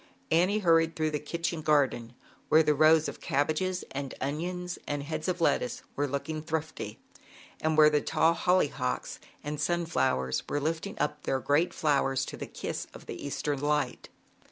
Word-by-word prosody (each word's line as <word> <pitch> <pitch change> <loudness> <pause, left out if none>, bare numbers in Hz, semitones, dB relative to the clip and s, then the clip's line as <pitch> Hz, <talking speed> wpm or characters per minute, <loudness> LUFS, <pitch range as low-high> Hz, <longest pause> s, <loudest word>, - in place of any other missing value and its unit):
Annie 180 +6 +4
hurried 165 -1 +4
through 155 -1 0
the 150 - -1
kitchen 165 +1 -3
garden, 135 -6 +1 0.4
where 160 +1 +6
the 150 -1 +3
rows 155 +1 +5
of - - -7
cabbages 170 +6 0
and 135 -1 -5
onions 175 +6 -3
and 145 -1 -2
heads 155 +2 -4
of 180 -1 -1
lettuce 250 +8 +1
were 145 +1 0
look 140 +3 -3
ing 155 -1 -3
thrifty, 160 -9 -4 0.6
and 155 0 +1
where 155 0 +8
the 150 -1 +2
tall 160 +2 +3
hollyhocks 150 -8 0 0.2
and 150 0 -4
sunflowers 150 - 0
were 145 - 0
lifting 165 +6 -3
up 150 0 -1
their 135 - 0
great 145 +6 +2
flowers 135 -3 +1
to - - -7
the - - -6
kiss - - -5
of - - -11
the - - -7
Eastern 145 0 -2
liht. 150 0 -1
155 Hz, 170 wpm, -29 LUFS, 145-165 Hz, 0.6 s, where